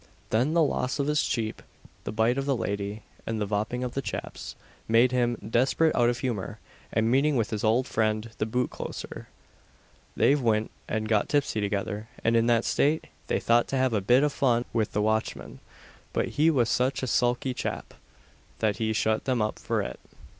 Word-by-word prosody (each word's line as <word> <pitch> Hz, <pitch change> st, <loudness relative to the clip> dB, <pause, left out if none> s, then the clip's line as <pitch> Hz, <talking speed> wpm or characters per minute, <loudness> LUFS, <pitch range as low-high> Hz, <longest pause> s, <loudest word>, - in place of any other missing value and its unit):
Then 125 Hz, +9 st, +2 dB
the 165 Hz, -, +5 dB
loss 125 Hz, -3 st, 0 dB
of 140 Hz, -, 0 dB
his 150 Hz, +1 st, +1 dB
sheep, 110 Hz, -5 st, -1 dB, 0.4 s
the -, -, -3 dB
bite 115 Hz, +4 st, +2 dB
of 135 Hz, -, -3 dB
the 135 Hz, -3 st, +2 dB
lady, 100 Hz, 0 st, -3 dB, 0.2 s
and 115 Hz, -1 st, -2 dB
"the 105 Hz, -, 0 dB
vhopping 105 Hz, +5 st, -2 dB
of 125 Hz, -, -5 dB
the 135 Hz, -, -1 dB
chaps," -, -, -6 dB, 0.3 s
made 115 Hz, +3 st, +4 dB
him 120 Hz, -2 st, +1 dB
"desperate 130 Hz, +7 st, +2 dB
out 120 Hz, -1 st, +4 dB
of 120 Hz, -, -1 dB
humour," 120 Hz, -8 st, -3 dB, 0.3 s
and 110 Hz, +1 st, +1 dB
meeting 140 Hz, +3 st, +3 dB
with 115 Hz, -4 st, 0 dB
his 105 Hz, -2 st, -3 dB
old 115 Hz, +4 st, +3 dB
friend 110 Hz, -1 st, -1 dB
the 110 Hz, -, 0 dB
boot 125 Hz, +3 st, -1 dB
closer, -, -, -7 dB, 0.9 s
they -, -, +4 dB
went 115 Hz, -6 st, +1 dB, 0.2 s
and 110 Hz, 0 st, -2 dB
got 105 Hz, -2 st, +1 dB
tipsy 140 Hz, -7 st, +1 dB
together, 105 Hz, +1 st, -3 dB
and, 115 Hz, +1 st, +3 dB
in 115 Hz, 0 st, +3 dB
that 115 Hz, -1 st, +3 dB
state, 150 Hz, +3 st, +1 dB, 0.2 s
they -, -, +1 dB
thought 120 Hz, 0 st, +3 dB
to 135 Hz, -, -1 dB
have 130 Hz, -2 st, +2 dB
a 105 Hz, -, +1 dB
bit 125 Hz, +8 st, +4 dB
of 150 Hz, -1 st, +1 dB
fun 125 Hz, -4 st, +2 dB
with 110 Hz, -3 st, 0 dB
the 105 Hz, -, +1 dB
watchman; 110 Hz, +1 st, -2 dB, 0.5 s
but -, -, 0 dB
he 155 Hz, +2 st, +3 dB
was 130 Hz, -7 st, +2 dB
"sich 130 Hz, +3 st, 0 dB
a -, -, +2 dB
sulky 125 Hz, +1 st, +1 dB
chap," -, -, -4 dB, 0.6 s
that 105 Hz, -2 st, 0 dB
he 110 Hz, 0 st, 0 dB
shut 110 Hz, 0 st, 0 dB
them 130 Hz, -2 st, +1 dB
up 105 Hz, 0 st, -1 dB
for -, -, -1 dB
it. -, -, -6 dB
115 Hz, 195 wpm, -27 LUFS, 110-130 Hz, 0.9 s, the